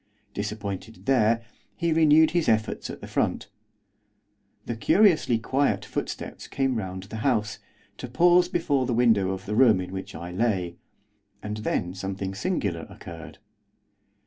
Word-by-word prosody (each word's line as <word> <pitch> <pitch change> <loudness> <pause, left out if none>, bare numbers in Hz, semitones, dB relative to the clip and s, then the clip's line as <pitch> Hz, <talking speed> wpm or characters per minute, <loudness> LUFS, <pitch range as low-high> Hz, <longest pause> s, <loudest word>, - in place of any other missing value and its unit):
Disappointed 105 +1 -5
there, 115 -3 +2 0.3
he 170 -2 0
renewed 160 0 +5
his 170 -4 +1
efforts 110 -1 0
at - - -8
the - - -8
front. - - -1 1.2
The 120 - -3
curiously 160 - +3
quiet 135 +5 0
footsteps - - -5
came 135 -4 0
round 95 -2 -5
the 110 +3 -8
house, 110 -2 0 0.4
to - - -5
pause 175 +7 +4
before 140 -7 0
the 120 - 0
window 110 -6 +3
of 95 +1 -4
the 105 - -3
room 110 -4 +5
in 90 0 -5
which 95 +1 -6
I 85 +1 -7
lay, 90 -4 -1 0.7
and 105 0 -4
then 90 -4 -2
something 95 0 -4
singular 100 - -2
occurred. 85 0 -10
110 Hz, 145 wpm, -26 LUFS, 95-135 Hz, 1.2 s, renewed